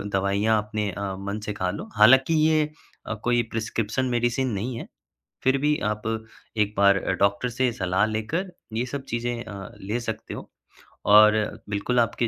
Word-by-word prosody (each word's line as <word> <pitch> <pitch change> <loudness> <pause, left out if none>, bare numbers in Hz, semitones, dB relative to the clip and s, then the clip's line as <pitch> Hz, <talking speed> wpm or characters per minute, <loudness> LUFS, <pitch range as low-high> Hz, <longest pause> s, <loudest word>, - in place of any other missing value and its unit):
दवाइयाँ 100 +2 +1
अपने 105 -1 -2
अ, 100 +1 -4
मन 100 +2 -4
से 105 - -2
खा 95 -3 -1
लो। - - -6
हालाँकि 130 +8 +6
ये 155 -1 +3 0.4
अ, 110 - -2
कोई 120 0 +3
प्रिस्क्रिप्शन 115 +2 -1
मेडिसिन 120 +2 +1
नहीं 115 +5 -3
है, - - -8 0.6
फिर 130 +1 +3
भी 150 +1 +2
आप 105 0 -4 0.6
एक 105 -1 +1
बार 100 -1 +5 0.2
डॉक्टर 100 +5 +2
से 125 +1 0
सलाह 95 -1 +1
लेकर 110 - -2 0.2
ये 120 +3 0
सब 140 +2 -5
चीज़ें 120 0 -2
अ, 100 -3 -8
ले 105 +5 -2
सकते 110 -2 -5
हो। - - -9 0.6
और 105 0 +8 0.4
बिल्कुल 105 +5 0
आपके 115 +1 +1
110 Hz, 165 wpm, -25 LUFS, 100-120 Hz, 0.6 s, और